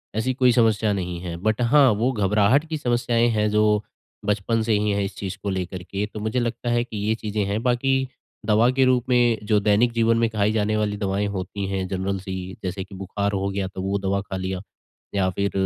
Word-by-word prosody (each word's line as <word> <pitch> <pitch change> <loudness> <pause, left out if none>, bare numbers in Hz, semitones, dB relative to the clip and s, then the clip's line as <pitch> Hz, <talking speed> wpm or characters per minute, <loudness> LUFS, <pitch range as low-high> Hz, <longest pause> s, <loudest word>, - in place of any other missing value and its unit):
ऐसी 110 +4 0
कोई 125 -1 +4
समस्या 110 -3 +3
नहीं 90 -3 -3
है। 85 -2 -5
बट 110 +2 +1
हाँ, 135 +3 +5
वो 115 +5 +1
घबराहट 105 +5 +2
की 160 - -2
समस्याएँ 120 -3 +1
हैं 105 -1 +1
जो, 105 0 +3 0.4
बचपन 105 +2 0
से 110 0 +1
ही 105 0 0
हैं 100 0 0
इस 100 - -5
चीज़ 95 -1 -5
को 100 - -1
लेकर 95 -1 -4
के। 100 +3 -3
तो - - -5
मुझे 110 +4 -1
लगता 120 0 -2
है, 120 0 +2
कि 120 -3 -8
ये 105 +2 0
चीज़ें 105 -2 -2
हैं। 100 +2 -1
बाकी 130 +2 +1 0.4
दवा 110 +3 +4
के 135 +1 +2
रूप 130 -1 +2
में 120 -2 +3
जो 105 -1 +4
दैनिक 105 +4 +3
जीवन 115 0 +3
में 115 0 +2
खाई 105 -1 +1
जाने 110 -1 0
वाली 105 -1 -1
दवाएँ 100 0 -1
होती 95 +1 -4
हैं, 95 -1 -2
जनरल 95 +1 -2
सी, 95 -1 -6
जैसे 95 +1 -3
कि 95 +1 -12
बुखार 100 +2 -2
हो 100 -1 -1
गया, 100 -1 -2
तो 95 0 -7
वो 95 +1 -1
दवा 100 0 0
खा 95 -1 -6
लिया। 95 0 -3 0.5
या 95 -2 +2
फिर 100 +2 -1
105 Hz, 225 wpm, -23 LUFS, 95-115 Hz, 0.5 s, हाँ